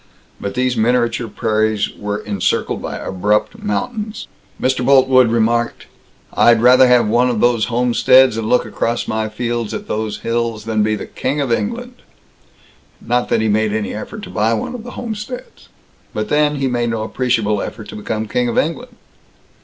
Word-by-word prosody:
But 100 - -5
these 125 0 +1
miniature 120 0 +1
prairies 110 -1 0
were 105 0 -3
encircled 100 -3 -1
by - - -5
abrupt 105 - -1
mountains. 215 0 -3 0.3
Mr. 130 -1 0
Boltwood 130 -1 +5
remarked, 115 +1 0 0.5
"I'd 120 -1 +5
rather 125 +2 +6
have 125 -3 +4
one 120 +3 +3
of 120 -3 -1
these 120 -2 +3
homesteads 125 +1 +4
and 110 -1 -3
look 125 - +3
across 115 +1 -2
my 110 0 -1
fields 115 0 -3
at - - -7
those 110 0 -3
hills 115 -1 -2
than 110 -1 0
be 110 0 +1 0.2
King 140 +3 -2
of 135 -4 -1
England." 240 - -2 1.0
Not 120 +1 -1
that 110 - +2
he 110 - +1
made 110 0 +1
any 110 -1 -2
effort 205 - -7
to - - -8
buy 110 +2 +1
one 110 - -4
of 245 -3 -7
the 245 - -9
homesteads. 230 +1 -7 0.5
But 105 0 -2
then, 150 0 +2
he 135 -1 -1
made 120 -2 0
no 115 -1 -2
appreciable 110 -4 0
effort 105 -1 -7
to - - -8
become 110 +1 -3
King 125 +3 0
of 120 - -2
England. 240 +10 -1
120 Hz, 170 wpm, -18 LUFS, 110-130 Hz, 1.0 s, rather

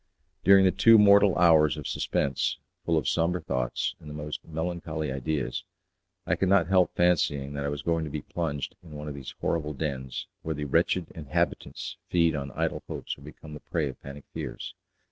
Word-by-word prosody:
During 95 0 +7
the 95 - +5
two 110 +5 +6
mortal 100 -2 +6
hours 80 -4 +5
of - - -7
suspense, 70 - 0 0.3
full 80 - +1
of 80 - 0
sombre 85 +2 +1
thoughts 65 -6 -2
and 75 - -11
the 75 - -7
most 75 0 -5
melancholy 80 -2 -3
ideas, 65 -1 -2 0.6
I - - +1
could 95 - 0
not 95 -3 +5
help 95 0 +3
fancying 75 -5 +2
that 70 0 -3
I - - 0
was 75 0 -4
going 80 -1 +1
to - - -5
be 75 0 -5
plunged 75 -5 -3
in 80 -3 -13
one 75 0 -7
of 75 - -4
these 70 -2 -8
horrible 75 -3 -1
dens, 65 -3 -4 0.2
where 80 -1 -3
the 75 0 -4
wretched 85 +4 +1
inhabitants 75 -5 -2
feed 85 -2 +3
on 70 -1 -3
idle - - -1
hopes - - -5
or - - -18
become 75 +1 -11
the 75 - -7
prey 75 -2 -2
of 65 - -11
panic 70 +1 -9
fears. - - -6
75 Hz, 195 wpm, -27 LUFS, 70-85 Hz, 0.6 s, During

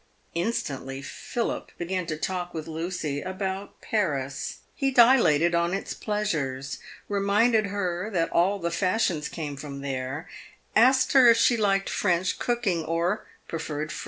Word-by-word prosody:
Instantly 140 - -2
Philip 235 +9 -4
began 180 0 -2
to 155 - -3
talk 175 +1 -3
with 155 -1 -4
Lucy 160 -3 -3
about 190 +1 -4
Paris. 140 -10 -2
He 275 - 0
dilated 230 - +5
on 170 +2 +2
its 195 - -4
pleasures; 145 - -2 0.3
reminded 205 +2 +3
her 190 -1 -2
that 170 -5 0
all 185 +4 +3
the 170 -3 -2
fashions 180 -3 0
came 150 -4 -5
from 140 0 -7
there; 135 +4 -4 0.5
asked 255 +3 +5
her 260 -3 +8
if 230 - +6
she 240 +1 +4
liked 195 -3 +1
French 180 -1 0
cooking, 225 -9 0
or 170 +6 -1 0.2
preferred 155 -2 -4
Ere. - - -5
180 Hz, 140 wpm, -26 LUFS, 155-210 Hz, 0.5 s, her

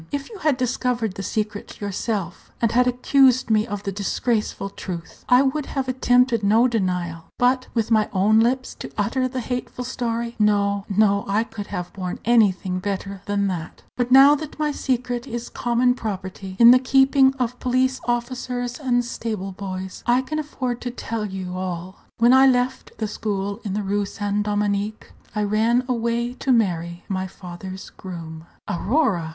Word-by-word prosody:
If 285 +7 -4
you 420 - -9
had 305 -6 +2
discovered 250 -4 -1
the 195 - -6
secret 210 +1 -4
yourself, 200 -2 -3
and 230 -2 +2
had 250 +1 +3
accused 255 0 +3
me 215 +1 +3
of 205 -2 -5
the 195 - -2
disgraceful 205 0 -1
truth, 175 -4 -7
I 250 +2 +6
would 275 +2 -1
have 270 -2 -2
attempted 250 -2 +3
no 220 +5 +4
denial; 180 -7 -2
but 255 +1 +2
with 225 -1 0
my 215 -2 +3
own 205 +3 +4
lips 255 +3 +1
to - - -6
utter 255 +5 +1
the 255 0 -4
hateful 250 +1 -4
story 235 -2 -3
no, 200 -1 +2
no, 200 0 +3
I 205 +3 +2
could 210 -3 -8
have 180 -3 -5
borne 185 -2 -4
anything 195 -5 +3
better 195 0 -4
than 200 0 +1
that. 170 -4 -6
But 245 -1 -1
now 270 +2 +9
that 295 0 -4
my 305 -1 0
secret 250 -2 -2
is 240 -1 -5
common 245 +1 +2
property, 190 -4 -6
in 235 0 +9
the 255 - +7
keeping 270 +1 +4
of 250 -2 -2
police 255 +1 +1
officers 245 +1 -2
and 245 -4 +1
stable 215 -5 -4
boys, 190 -1 -6
I 245 +2 +3
can 310 +3 -3
afford 255 -5 -3
to 245 - -3
tell 230 -2 -4
you 190 -2 -5
all. 185 0 -5 0.2
When 235 +2 +5
I 265 +1 +7
left 250 0 0
the 220 - -2
school 200 0 -3
in 200 -4 -3
the 210 +1 -1
Rue 200 +1 0
Saint 205 +1 -2
Dominique, 205 +1 -1 0.2
I 210 - +1
ran 225 +4 +2
away 235 0 -1
to 265 - -1
marry 175 -7 0
my 190 -1 -2
father's 185 +1 -9
groom!" 165 -3 -8 0.2
"Aurora!" 195 - +1
225 Hz, 170 wpm, -23 LUFS, 195-250 Hz, 0.2 s, now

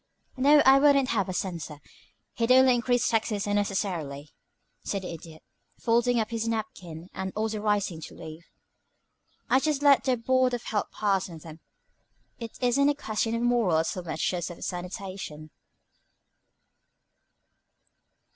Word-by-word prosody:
"No, 290 +3 +5
I 270 +1 +7
wouldn't 275 -2 +4
have 200 -5 0
a - - -3
censor; 170 -5 -4 0.6
he'd 230 +1 0
only 260 0 +6
increase 245 0 +1
taxes 220 -2 0
unnecessarily," 190 -8 -2 0.5
said 195 -2 -3
the 180 - -5
Idiot, 160 -1 -12 0.4
folding 240 +1 +2
up 220 0 -2
his 230 0 -2
napkin, 185 -7 -5
and 190 0 -4
also 220 0 -2
rising 205 -5 -1
to - - -14
leave. 160 +1 -10 1.0
"I'd 260 - +3
just 295 -1 -1
let 285 -2 +5
the 255 -1 +2
Board 255 +1 +2
of 240 - -7
Health 210 -2 -2
pass 195 -3 0
on 165 - -9
them; 160 0 -12 0.8
it 230 -2 -8
isn't 265 +3 +3
a 290 - +1
question 225 -3 -2
of 230 - -2
morals 210 -10 +2
so 185 - -5
much 165 +1 -2
as 175 -1 -3
of 175 - -9
sanitation." 180 -4 -6
210 Hz, 145 wpm, -27 LUFS, 175-245 Hz, 1.0 s, I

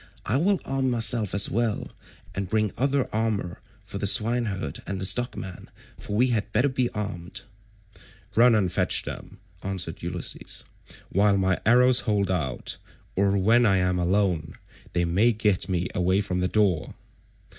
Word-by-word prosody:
I - - +1
will 190 +6 +2
arm 135 -1 0
myself 115 -4 +2
as 100 - +5
well, 115 -1 -1 0.4
and 95 0 -3
will - - -19
bring 110 -1 +1
other 135 +1 +1
armour 105 -5 -2 0.2
for 95 +1 -7
the 100 - 0
swineherd 105 - +1
and 95 -1 -3
the 95 - -1
stockman, 95 -4 -2 0.3
for 105 - -6
we 125 +4 +3
had 110 -2 -1
better 120 +7 +2
be 130 -2 0
armed." 100 -5 -5 0.9
"Run 120 0 +5
and 95 -5 +1
fetch - - +1
them," - - -8 0.2
answered 95 -2 -5
Ulysses, - - -3 0.5
"while 100 +1 +3
my 95 -1 +1
arrows 125 +1 +6
hold 100 -3 0
out, 70 -9 -2 0.4
or 100 +1 +2
when 115 +5 +4
I 100 -5 +4
am 90 0 +1
alone 90 -3 0 0.4
they 85 -1 +1
may 100 +8 +3
get 105 -3 0
me 90 -1 0
away 90 +2 +1
from 90 -2 -3
the 90 - +1
door." 95 -6 0
100 Hz, 160 wpm, -25 LUFS, 95-115 Hz, 0.9 s, arrows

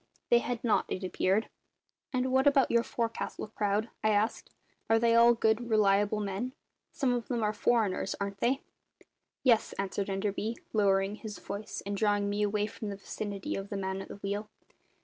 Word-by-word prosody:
They 240 - +7
had 240 -1 -3
not, 215 -5 +2
it 185 - -3
appeared. 190 +3 +1 0.6
"And 255 0 0
what 265 +2 +4
about 275 -2 +4
your 235 - +4
forecastle 230 -2 -3
crowd?" 210 +1 -1
I 215 - +4
asked. 215 +1 +1 0.4
"Are 225 - +5
they 230 0 +3
all 235 +1 +7
good, 225 +1 +1
reliable 205 -1 +3
men? 205 +5 -3 0.4
Some 265 -4 +1
of 240 -1 -2
them 235 -3 -1
are 210 0 +1
foreigners, 220 -5 +1
aren't 200 -1 -3
they?" 260 +5 +1 0.8
"Yes," 240 -4 +3
answered 195 0 -2
Enderby, 205 +3 -2 0.2
lowering 200 -1 +2
his 215 -3 -7
voice 200 +2 -6
and 200 0 -2
drawing 205 -1 +1
me 205 +1 -1
away 210 0 +1
from 215 0 -6
the 200 - -4
vicinity 200 0 -4
of 195 0 -5
the 200 - -3
man 190 0 -3
at - - -8
the - - -8
wheel. 200 +1 -4
210 Hz, 180 wpm, -30 LUFS, 200-230 Hz, 0.8 s, They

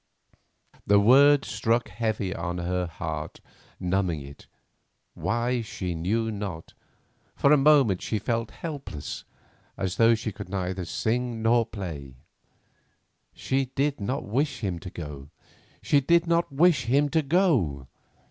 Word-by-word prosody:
The 100 0 +6
words 140 +6 +6
struck 115 -1 0
heavy 105 -2 -2
on 85 0 -4
her 90 +1 -1
heart, 80 - -5 0.4
numbing 90 -4 0
it—why, 120 - -5
she 95 -5 -4
knew 110 +7 -1
not. 100 -6 -6 0.6
For 140 - +3
a - - +8
moment 135 -9 +4
she 110 - -2
felt 115 +2 -2
helpless, 140 - -7 0.5
as 95 -1 -3
though 115 0 +5
she 110 0 -4
could 100 -1 -9
neither 95 -1 -3
sing 115 +4 -2
nor 115 0 +3
play. 80 - -7 1.2
She 135 0 0
did 145 +1 0
not 130 +8 -2
wish 135 +4 -1
him 95 -5 -2
to 90 - -8
go; 75 -5 -8 0.5
she 145 - +4
did 170 +5 +3
not 170 -1 +1
wish 145 -2 +3
him 140 +5 +3
to 160 +2 +2
go. 135 - +1
110 Hz, 130 wpm, -26 LUFS, 90-135 Hz, 1.2 s, a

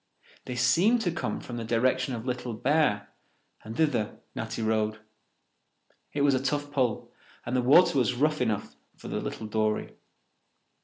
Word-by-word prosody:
They 125 - -5
seemed 170 - +3
to 180 -5 0
come 160 - -3
from 120 - -7
the 115 - -4
direction 130 +3 +1
of 115 0 -6
Little 125 -2 -3
Bear, 135 -5 +1 0.5
and 110 +2 -8
thither 135 -9 +1 0.2
Natty 115 - -4
rowed. 110 -1 0 1.1
It 145 - -2
was 140 -1 +4
a 130 - +1
tough 145 +1 -2
pull, 125 -6 -1 0.3
and 120 - -2
the 125 - +3
water 140 +3 +5
was 125 0 +1
rough 150 +2 +1
enough 110 -4 -1 0.2
for - - -9
the - - -2
little 110 - -5
dory. 110 0 -1
125 Hz, 160 wpm, -28 LUFS, 110-145 Hz, 1.1 s, water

